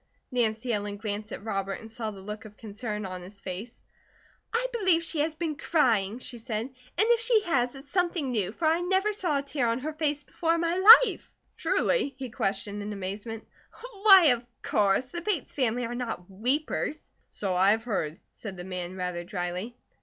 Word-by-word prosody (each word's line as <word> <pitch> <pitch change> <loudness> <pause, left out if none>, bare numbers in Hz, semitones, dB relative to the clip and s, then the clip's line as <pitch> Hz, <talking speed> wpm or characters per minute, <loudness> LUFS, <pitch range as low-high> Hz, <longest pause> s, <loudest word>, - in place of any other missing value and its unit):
Nancy 235 0 0
Ellen 205 -1 -3
glanced 210 0 -4
at - - -6
Robert, 195 -2 -2
and 225 -1 -10
saw 225 -1 -3
the 200 -2 -9
look 210 +2 -7
of 210 -1 -13
concern 210 -1 -5
on 185 -1 -6
his 195 +3 -11
face. 195 +5 -7 0.7
"I 465 +2 0
believe 375 -7 +3
she 330 -2 -2
has 310 +1 0
been 315 -1 -2
crying," 230 - +2
she 250 -1 -5
said. 225 -2 -3
"And - - -29 0.2
if 455 +4 +4
she 455 -1 +3
has, 260 -9 0
it's 275 +1 -12
something 345 -7 0
new, 205 -5 0
for 315 - -4
I 325 +2 +3
never 380 +4 +1
saw 350 -8 0
a 280 - -2
tear 280 -3 -1
on 230 0 +1
her 310 +3 -3
face 300 -2 -1
before 330 +3 0
in 335 - -1
my 335 0 +1 0.3
life." - - -6 0.2
"Truly?" 425 - +1
he 260 -3 -6
questioned 205 -1 -2
in 210 +1 -4
amazement. 205 +3 -5 0.6
"Why, 385 -6 +9
of 245 -1 +2 0.2
course! 205 +5 +2
The 345 +5 -5
Bates 365 -5 -2
family 245 -3 0
are 235 - -4
not 235 -7 -4
weepers." 260 +9 -1 0.3
"So 195 -3 -3
I 190 +2 +5
have 220 +2 +2
heard," 170 -9 -2
said 195 -4 -8
the 175 - -6
man, 180 -1 -5
rather 180 -2 -3
dryly. 180 +4 -4
235 Hz, 195 wpm, -28 LUFS, 200-310 Hz, 0.7 s, Why